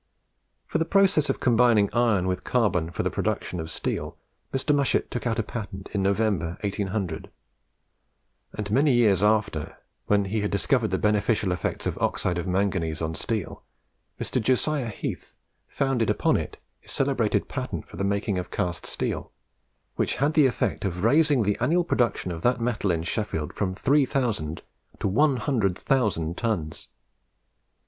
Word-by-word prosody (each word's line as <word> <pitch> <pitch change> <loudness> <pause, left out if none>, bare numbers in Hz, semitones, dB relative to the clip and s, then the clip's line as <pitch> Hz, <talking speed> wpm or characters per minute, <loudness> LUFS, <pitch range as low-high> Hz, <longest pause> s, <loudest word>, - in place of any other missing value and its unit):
For - - -1
the 165 - +1
process 190 -5 +3
of - - 0
combining 115 -4 +4
iron 115 -6 +2
with 95 -1 -1
carbon 100 -9 +1
for 85 - -3
the - - 0
production 90 - -2
of 80 0 -5
steel, - - -3 0.3
Mr. 135 +2 +1
Mushet 140 -2 +1
took 120 0 -3
out 115 -1 0
a 115 - +1
patent 100 -4 -7
in 100 - -1
November, 95 -4 0
1800; 100 -1 -3 1.3
and 105 -1 -4
many 140 +4 +4
years 105 -6 +4
after, 105 -7 +1 0.3
when 100 -1 +3
he 105 +2 -1
had 105 - 0
discovered 115 +3 +1
the 95 -2 -1
beneficial 105 -1 +1
effects 90 -2 -2
of - - -2
oxide 90 -1 0
of 85 - -4
manganese 90 -4 0
on 80 0 -2
steel, 105 +1 -3 0.6
Mr. - - -1
Josiah 130 +2 +1
Heath 105 - -6 0.3
founded 135 -5 0
upon - - +2
it - - -3 0.2
his - - -16
celebrated - - +1
patent - - -4
for - - -11
the 95 - -1
making 100 0 0
of 90 - -6
cast 85 -3 -3
steel, - - -3 0.7
which - - 0
had 145 +4 +1
the 150 -4 +6
effect 120 - -1
of 90 -2 -2
raising 145 +1 +4
the 105 0 0
annual 175 +3 +2
production 120 - 0
of 80 -1 -5
that 125 +5 +2
metal 115 -4 -1
in 85 -2 0
Sheffield 85 -5 -3
from 95 -2 -2
3000 125 - +1 0.4
to - - 0
100,000 110 - +1
tons. 95 -10 -3
105 Hz, 155 wpm, -26 LUFS, 95-125 Hz, 1.3 s, the